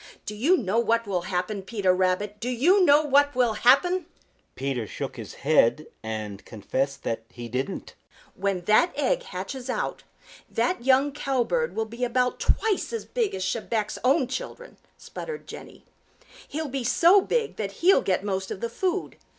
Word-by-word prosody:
Do -, -, -5 dB
you 285 Hz, -, +3 dB
know 215 Hz, -, 0 dB
what 230 Hz, 0 st, +1 dB
will 190 Hz, -3 st, -1 dB
happen, 185 Hz, +3 st, -2 dB
Peter 190 Hz, -2 st, +1 dB
Rabbit? 190 Hz, +3 st, 0 dB
Do 240 Hz, -, -3 dB
you 340 Hz, -, +4 dB
know 295 Hz, -2 st, +6 dB
what 285 Hz, -1 st, +3 dB
will 245 Hz, -3 st, +2 dB
happen?" 310 Hz, -, +3 dB, 0.5 s
Peter 130 Hz, -4 st, -3 dB
shook -, -, -5 dB
his -, -, -8 dB
head 150 Hz, 0 st, +3 dB, 0.2 s
and 110 Hz, -2 st, -5 dB
confessed 135 Hz, +6 st, -3 dB
that 115 Hz, 0 st, -2 dB
he 120 Hz, -1 st, -8 dB
didn't. 130 Hz, +3 st, -4 dB, 0.4 s
"When 195 Hz, -1 st, -1 dB
that 215 Hz, -, +3 dB
egg -, -, +1 dB
hatches 270 Hz, -, -6 dB
out, -, -, -2 dB, 0.5 s
that 360 Hz, -9 st, -1 dB
young 265 Hz, +2 st, +4 dB
Cowbird 285 Hz, -, -1 dB
will 225 Hz, -, 0 dB
be 235 Hz, +3 st, -6 dB
about 250 Hz, +1 st, +1 dB
twice 435 Hz, -4 st, +1 dB
as 460 Hz, -, -4 dB
big 470 Hz, -4 st, -1 dB
as 190 Hz, -1 st, -3 dB
Chebec's 215 Hz, +1 st, -2 dB
own 270 Hz, +2 st, +3 dB
children," -, -, -7 dB, 0.2 s
sputtered 465 Hz, -2 st, -7 dB
Jenny. -, -, -11 dB, 0.6 s
"He'll 315 Hz, +1 st, -4 dB
be 270 Hz, -1 st, -3 dB
so 350 Hz, +10 st, +5 dB
big 450 Hz, +2 st, -1 dB
that 200 Hz, -2 st, -3 dB
he'll 385 Hz, -, +6 dB
get 190 Hz, 0 st, 0 dB
most 190 Hz, -2 st, -2 dB
of -, -, -5 dB
the 235 Hz, -, -3 dB
food. 370 Hz, +9 st, -2 dB
235 Hz, 165 wpm, -26 LUFS, 190-300 Hz, 0.6 s, know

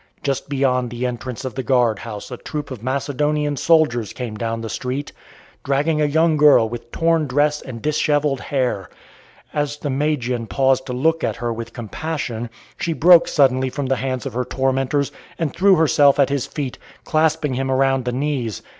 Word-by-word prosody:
Just 140 Hz, -1 st, -2 dB
beyond 130 Hz, -3 st, +1 dB
the 120 Hz, +2 st, -4 dB
entrance 125 Hz, +1 st, -5 dB
of 130 Hz, -, -4 dB
the 130 Hz, -, -3 dB
guard 120 Hz, -5 st, +2 dB
house 110 Hz, +1 st, -8 dB
a 125 Hz, -, -5 dB
troop 150 Hz, +1 st, -6 dB
of 125 Hz, -5 st, -7 dB
Macedonian 145 Hz, +3 st, -1 dB
soldiers 135 Hz, -, +2 dB
came 120 Hz, -4 st, -5 dB
down 115 Hz, +1 st, -3 dB
the 115 Hz, -, -5 dB
street, 130 Hz, +5 st, -4 dB, 0.5 s
dragging 150 Hz, +3 st, +1 dB
a -, -, +4 dB
young 160 Hz, +2 st, +2 dB
girl 145 Hz, -6 st, +6 dB
with 120 Hz, +1 st, -8 dB
torn 165 Hz, -2 st, +1 dB
dress 145 Hz, +3 st, +1 dB
and 115 Hz, -4 st, -9 dB
dishevelled 150 Hz, -2 st, +1 dB
hair. 125 Hz, -9 st, -1 dB, 0.6 s
As 145 Hz, -1 st, -1 dB
the 145 Hz, -1 st, -3 dB
Magian 130 Hz, -5 st, -1 dB
paused 135 Hz, 0 st, +1 dB
to 125 Hz, -, -3 dB
look 160 Hz, +6 st, +1 dB
at -, -, 0 dB
her 120 Hz, -1 st, -3 dB
with 115 Hz, 0 st, -7 dB
compassion, 120 Hz, -1 st, -4 dB, 0.3 s
she 170 Hz, -, -1 dB
broke 170 Hz, +1 st, +6 dB
suddenly 130 Hz, -3 st, +3 dB
from 140 Hz, +2 st, -4 dB
the 135 Hz, 0 st, 0 dB
hands 130 Hz, -1 st, -3 dB
of -, -, -4 dB
her 125 Hz, +2 st, -1 dB
tormentors, 135 Hz, +2 st, 0 dB, 0.3 s
and 160 Hz, -5 st, -2 dB
threw 195 Hz, +1 st, +5 dB
herself 145 Hz, -3 st, +4 dB
at 140 Hz, -, +4 dB
his 140 Hz, -2 st, -1 dB
feet, 140 Hz, -5 st, -5 dB, 0.2 s
clasping 155 Hz, -2 st, +1 dB
him 130 Hz, +1 st, -2 dB
around 135 Hz, -1 st, +2 dB
the 125 Hz, -, 0 dB
knees. 125 Hz, -5 st, -2 dB
135 Hz, 180 wpm, -21 LUFS, 125-150 Hz, 0.6 s, girl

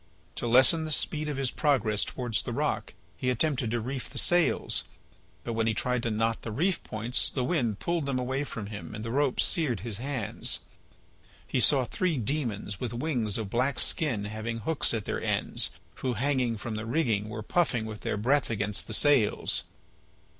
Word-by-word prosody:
To 120 Hz, -, -2 dB
lessen 130 Hz, +7 st, +6 dB
the 155 Hz, -, -4 dB
speed 155 Hz, 0 st, 0 dB
of 145 Hz, -, -3 dB
his 135 Hz, -2 st, +1 dB
progress 115 Hz, -9 st, +2 dB
towards 120 Hz, -5 st, -1 dB
the -, -, -4 dB
rock -, -, -1 dB, 0.2 s
he 125 Hz, -, -1 dB
attempted 125 Hz, -1 st, +1 dB
to 120 Hz, +1 st, 0 dB
reef 125 Hz, +3 st, -4 dB
the -, -, -9 dB
sails, 175 Hz, -1 st, +3 dB, 0.6 s
but 115 Hz, -, -3 dB
when 115 Hz, 0 st, +1 dB
he 110 Hz, -, +1 dB
tried 125 Hz, +1 st, 0 dB
to 115 Hz, -, -1 dB
knot 115 Hz, +1 st, 0 dB
the 115 Hz, -, -5 dB
reef 170 Hz, -, 0 dB
points 115 Hz, +3 st, 0 dB
the 130 Hz, -, -2 dB
wind 125 Hz, -, 0 dB
pulled 170 Hz, 0 st, -1 dB
them 135 Hz, -2 st, 0 dB
away 130 Hz, +2 st, -1 dB
from 115 Hz, -7 st, -5 dB
him 105 Hz, +1 st, -7 dB
and 105 Hz, +1 st, -6 dB
the 115 Hz, -, -3 dB
rope 140 Hz, 0 st, +1 dB
seared 140 Hz, -, +2 dB
his 115 Hz, -2 st, -5 dB
hands. 130 Hz, -4 st, -2 dB, 0.8 s
He -, -, -1 dB
saw 135 Hz, 0 st, +5 dB
three 175 Hz, +3 st, 0 dB
demons 115 Hz, -6 st, -2 dB
with 120 Hz, -2 st, -3 dB
wings 120 Hz, -7 st, 0 dB
of 105 Hz, -3 st, -4 dB
black 130 Hz, +3 st, +1 dB
skin 125 Hz, -11 st, +1 dB
having 110 Hz, +2 st, -4 dB
hooks 160 Hz, +1 st, +1 dB
at 110 Hz, -, -3 dB
their -, -, -2 dB
ends, -, -, +1 dB, 0.3 s
who, 125 Hz, -2 st, -1 dB
hanging 125 Hz, -1 st, +1 dB
from 110 Hz, +2 st, -5 dB
the 110 Hz, +1 st, -4 dB
rigging, 115 Hz, -7 st, +1 dB
were 110 Hz, 0 st, -5 dB
puffing 125 Hz, -5 st, +1 dB
with 110 Hz, -1 st, -7 dB
their -, -, -2 dB
breath 130 Hz, +6 st, +2 dB
against 105 Hz, -2 st, -1 dB
the 110 Hz, -, -3 dB
sails. 140 Hz, -7 st, +2 dB
120 Hz, 190 wpm, -29 LUFS, 110-140 Hz, 0.8 s, lessen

